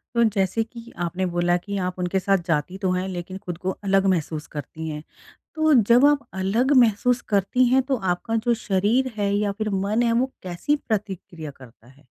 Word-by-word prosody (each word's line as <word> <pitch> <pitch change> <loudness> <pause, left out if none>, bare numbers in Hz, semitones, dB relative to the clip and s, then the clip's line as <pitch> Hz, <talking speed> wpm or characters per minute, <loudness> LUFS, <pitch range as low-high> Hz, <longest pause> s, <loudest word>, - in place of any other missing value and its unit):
तो 235 - +4
जैसे 195 +4 +1
कि 235 +1 -12
आपने 175 +2 -1
बोला 175 0 +1
कि 200 +3 -5
आप 185 - -11
उनके 180 +2 0
साथ 195 +1 +2
जाती 165 +3 -1
तो 190 -2 -1
हैं 185 +1 -1
लेकिन 185 0 -6
ख़ुद 175 -2 -4
को 185 +1 -2
अलग 195 0 +2
महसूस 155 -2 -3
करती 160 +3 -6
हैं। 150 0 -6 0.5
तो 315 -1 +3 0.2
जब 250 +4 +7
आप 290 -1 +3
अलग 205 +8 +1
महसूस 240 +1 +3
करती 205 +5 +2
हैं 260 +2 +4
तो - - +4 0.2
आपका 225 +6 -4
जो 240 - +5
शरीर 215 +7 +1
है 200 -1 0
या 205 0 +1
फ़िर 215 +2 -3 0.2
मन 220 +4 +1
है 230 - +2
वो 255 +3 +1
कैसी 185 +11 -1
प्रतिक्रिया 190 - -5
करता 120 -3 -17
है? 135 +2 -21
195 Hz, 195 wpm, -23 LUFS, 175-230 Hz, 0.5 s, जब